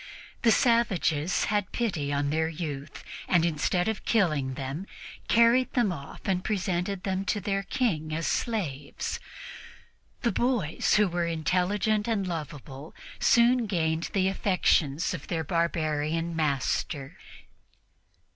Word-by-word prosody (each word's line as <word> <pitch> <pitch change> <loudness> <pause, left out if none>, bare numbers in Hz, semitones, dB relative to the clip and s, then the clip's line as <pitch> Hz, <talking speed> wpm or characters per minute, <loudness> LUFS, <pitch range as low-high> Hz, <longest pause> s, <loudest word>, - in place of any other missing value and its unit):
The 235 - +4
savages 190 - +2
had 205 -2 -1
pity 175 -12 -1
on 145 0 0
their 160 +1 +1
youth 150 -3 -6 0.2
and, 175 -2 +3
instead 175 +3 0
of 220 -1 -2
killing 155 - +1
them, 140 +8 -5 0.4
carried 235 +2 +4
them 235 -6 +2
off 140 -5 -8
and 185 -1 0
presented 190 -2 -1
them 190 0 -1
to 205 - 0
their 195 -1 -1
King 185 -7 -1
as 160 +1 -2
slaves. 155 - -2 1.0
The 235 - +2
boys, 240 - +1
who 210 -1 +4
were 175 -1 -1
intelligent 185 +6 0
and 215 -4 0
lovable, 150 -4 -6 0.2
soon 240 0 +4
gained 165 -3 0
the 190 -2 +2
affections 180 -5 +1
of - - -7
their 165 -2 -1
barbarian 165 0 -1
master. 145 0 -1
175 Hz, 125 wpm, -28 LUFS, 155-205 Hz, 1.0 s, The